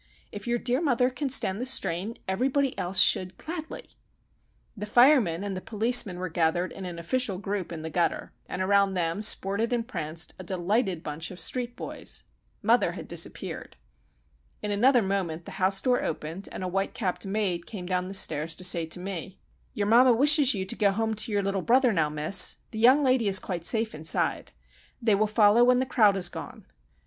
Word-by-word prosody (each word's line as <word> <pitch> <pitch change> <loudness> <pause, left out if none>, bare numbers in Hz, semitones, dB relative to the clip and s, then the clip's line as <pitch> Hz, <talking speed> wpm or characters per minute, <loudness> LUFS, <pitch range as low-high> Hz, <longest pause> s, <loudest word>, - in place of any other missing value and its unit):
If 205 +2 -9
your 240 0 +1
dear 250 +4 -1
mother 255 -5 +1
can 270 +2 -4
stand 215 -5 0
the - - -2
strain, 210 -4 -1
everybody 265 +7 0
else 180 +2 0
should 185 0 +3
gladly!" 320 -1 -7 0.9
The 210 -1 -6
firemen 235 - +4
and 195 -2 -5
policemen 220 -4 +2
were 185 +1 -4
gathered 170 +2 -1
in 190 - -8
an 175 -2 -7
official 200 +3 -2
group 195 -2 -4
in 160 -2 -7
the 160 - -6
gutter, 170 +1 -2 0.2
and 185 - -3
around 200 0 +2
them 170 +2 -1
sported 210 +2 +2
and 235 -2 -2
pranced 160 -7 -4
a - - -7
delighted 185 0 -1
bunch 150 +2 -5
of 185 - -11
street 245 +7 -2
boys. - - -5 0.4
Mother - - +2
had - - -9
disappeared. - - -3 0.9
In 210 - -3
another 245 +4 +3
moment 185 -4 -3
the - - -9
house 195 +1 +3
door 250 -1 +1
opened, 165 +5 -5
and - - -7
a - - -2
whitecapped 195 +1 -2
maid 190 -4 -2
came 190 -5 -7
down 180 0 -2
the 195 - -6
stairs 160 -3 +2
to 185 - -8
say 170 -2 +1
to 165 - -4
me,— 185 0 -6 0.4
"Your 205 - -1
mamma 240 +4 +5
wishes 280 +1 +5
you 190 -1 -3
to 190 - -2
go 205 - +2
home 220 +3 -1
to 215 +2 0
your 205 -1 0
little 195 0 -2
brother 250 +2 +3
now, 155 -4 +1
miss. 155 +5 +3 0.2
The 220 - -6
young 260 +6 +5
lady 255 -4 +2
is 195 -1 +6
quite 180 -3 -3
safe 225 +1 +1
inside. 155 +1 -1 0.5
They 230 -4 +1
will 210 +2 +2
follow 215 +2 +4
when 250 0 +4
the 260 - 0
crowd 220 -8 +3
has 185 -2 +1
gone. - - -10
200 Hz, 195 wpm, -26 LUFS, 180-240 Hz, 0.9 s, is